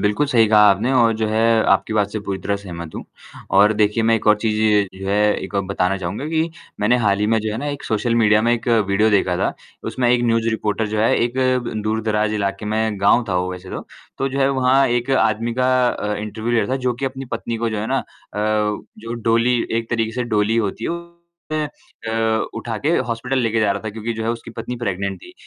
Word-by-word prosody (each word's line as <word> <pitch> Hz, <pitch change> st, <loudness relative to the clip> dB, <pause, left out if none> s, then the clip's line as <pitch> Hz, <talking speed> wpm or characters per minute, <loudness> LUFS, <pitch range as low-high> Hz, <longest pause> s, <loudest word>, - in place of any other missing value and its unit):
बिल्कुल 105 Hz, +8 st, +1 dB
सही 120 Hz, -5 st, +4 dB
कहा 105 Hz, -1 st, +5 dB
आपने 110 Hz, +7 st, +1 dB
और 120 Hz, -3 st, +4 dB
जो 110 Hz, 0 st, 0 dB
है 110 Hz, +1 st, +3 dB
आपकी 110 Hz, -, +1 dB
बात 105 Hz, -2 st, +1 dB
से 110 Hz, -, -3 dB
पूरी 100 Hz, -1 st, -4 dB
तरह 100 Hz, +2 st, -2 dB
सहमत 85 Hz, -5 st, -8 dB
हूँ -, -, -6 dB, 0.5 s
और 105 Hz, +2 st, +6 dB
देखिए 105 Hz, +2 st, +2 dB
मैं 115 Hz, +1 st, +3 dB
एक 110 Hz, -, -6 dB
और 105 Hz, 0 st, +6 dB
चीज़ 110 Hz, 0 st, -1 dB, 0.4 s
जो -, -, -4 dB
है 100 Hz, -, +1 dB, 0.3 s
एक 95 Hz, -, -10 dB
और 100 Hz, -, +1 dB
बताना 95 Hz, 0 st, 0 dB
चाहूँगा 95 Hz, +10 st, -4 dB
कि 160 Hz, +1 st, 0 dB, 0.3 s
मैंने 110 Hz, +4 st, +3 dB
हाल 100 Hz, -1 st, +3 dB
ही 105 Hz, -, +2 dB
में 115 Hz, +1 st, +2 dB
जो 110 Hz, 0 st, -3 dB
है 110 Hz, -, -3 dB
ना 145 Hz, -, -4 dB
एक 145 Hz, -1 st, -5 dB
सोशल 115 Hz, +2 st, 0 dB
मीडिया 110 Hz, -2 st, +4 dB
में 120 Hz, +1 st, +3 dB
1 120 Hz, 0 st, -2 dB, 0.2 s
वीडियो 105 Hz, +3 st, +3 dB
देखा 95 Hz, -3 st, +2 dB
था। -, -, 0 dB, 0.3 s
उसमें 125 Hz, -2 st, 0 dB
एक 120 Hz, -1 st, +3 dB
न्यूज़ 115 Hz, -1 st, +1 dB
रिपोर्टर 110 Hz, 0 st, -1 dB
जो 110 Hz, +1 st, -3 dB
है 110 Hz, -, +3 dB
एक 120 Hz, +1 st, -3 dB, 0.5 s
दूर-दराज 110 Hz, -1 st, 0 dB
इलाके 100 Hz, -1 st, -2 dB
में 110 Hz, -1 st, -1 dB
गाँव 110 Hz, +5 st, +4 dB
था, 90 Hz, -, 0 dB
वो 90 Hz, +1 st, -1 dB
वैसे 90 Hz, +1 st, -9 dB
तो। -, -, -6 dB, 0.3 s
तो 135 Hz, -, 0 dB
जो 135 Hz, +1 st, -4 dB
है 135 Hz, -, +4 dB
वहाँ 135 Hz, 0 st, +3 dB
एक 120 Hz, +2 st, -1 dB
आदमी 115 Hz, -2 st, +1 dB
का 130 Hz, 0 st, +2 dB
अ, 105 Hz, -3 st, -2 dB
इंटरव्यू 110 Hz, +2 st, -4 dB
ले 120 Hz, -, +3 dB
रहा 115 Hz, +6 st, -2 dB
था -, -, +2 dB
जो 125 Hz, -, +3 dB
कि 130 Hz, -, -5 dB
अपनी 135 Hz, 0 st, -4 dB
पत्नी 115 Hz, 0 st, -3 dB
को -, -, +2 dB
जो 110 Hz, -, -3 dB
है 105 Hz, -, -3 dB
ना 135 Hz, +3 st, +1 dB
अ, -, -, -5 dB, 0.3 s
जो 105 Hz, +1 st, -2 dB
डोली 115 Hz, +1 st, +2 dB, 0.2 s
एक 115 Hz, 0 st, -3 dB
तरीके 115 Hz, -1 st, 0 dB
से -, -, +2 dB
डोली 105 Hz, +2 st, +2 dB
होती 110 Hz, 0 st, -1 dB
है -, -, -1 dB, 0.6 s
है 155 Hz, 0 st, 0 dB
उसमे 115 Hz, -5 st, -9 dB, 0.2 s
अ, -, -, -1 dB
उठा 115 Hz, 0 st, -4 dB
के -, -, +2 dB, 0.2 s
हॉस्पिटल 125 Hz, +3 st, -1 dB
लेकर 115 Hz, -2 st, +1 dB
जा 105 Hz, -2 st, +3 dB
रहा 100 Hz, -, -5 dB
था 110 Hz, -, -3 dB
क्योंकि 110 Hz, +2 st, -4 dB
जो 110 Hz, 0 st, -5 dB
है 115 Hz, -, 0 dB
उसकी 115 Hz, 0 st, -6 dB
पत्नी 115 Hz, +2 st, -6 dB
प्रेग्नेंट 100 Hz, -4 st, -3 dB
थी। -, -, -12 dB
110 Hz, 245 wpm, -20 LUFS, 105-120 Hz, 0.6 s, और